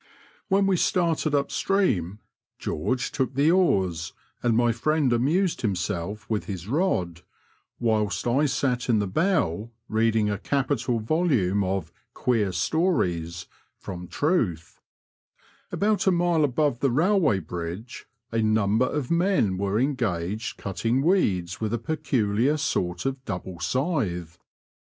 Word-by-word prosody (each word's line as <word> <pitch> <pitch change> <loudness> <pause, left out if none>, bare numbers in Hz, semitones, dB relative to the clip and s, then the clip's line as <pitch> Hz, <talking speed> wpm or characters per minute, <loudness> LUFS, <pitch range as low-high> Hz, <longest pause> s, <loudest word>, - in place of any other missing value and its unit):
When 195 0 +3
we 190 -2 +2
started 165 -4 +1
up 140 -1 0
stream, 105 - 0 0.4
George 125 +11 -2
took 130 -2 -2
the 145 +4 +4
oars, 95 - +1 0.3
and 115 -2 +2
my 120 0 +3
friend 140 +3 +1
amused 160 +10 +1
himself 100 0 -2
with 110 -2 -2
his 95 -2 -6
rod, 105 - 0 0.6
whilst 110 -3 0
I 135 +5 +2
sat 125 -2 -1
in 115 - +4
the 105 - +1
bow 115 - 0 0.2
reading 110 -1 +2
a 105 -1 -1
capital 130 -3 0
volume 110 - +1
of 95 -3 -2 0.2
*'Qaeer 110 -6 +1
Stories" 85 - 0 0.3
from 90 -2 -7
Truth, 100 - -1 0.9
About 205 -1 +1
a - - +6
mile 175 -2 +2
above 145 -2 +1
the 135 - +2
railway 160 - +3
bridge 90 +6 -6 0.2
a 115 0 +1
number 110 +2 +2
of 145 -2 -3
men 170 - +2
were 100 +2 0
engaged 110 -7 -1
cutting 115 +7 -1
weeds 95 - +1
with 110 +1 0
a - - -1
peculiar 130 -1 0
sort 90 - -1
of 135 -1 -2
double 90 -5 -6
scythe. 95 - -2
115 Hz, 130 wpm, -25 LUFS, 95-150 Hz, 0.9 s, a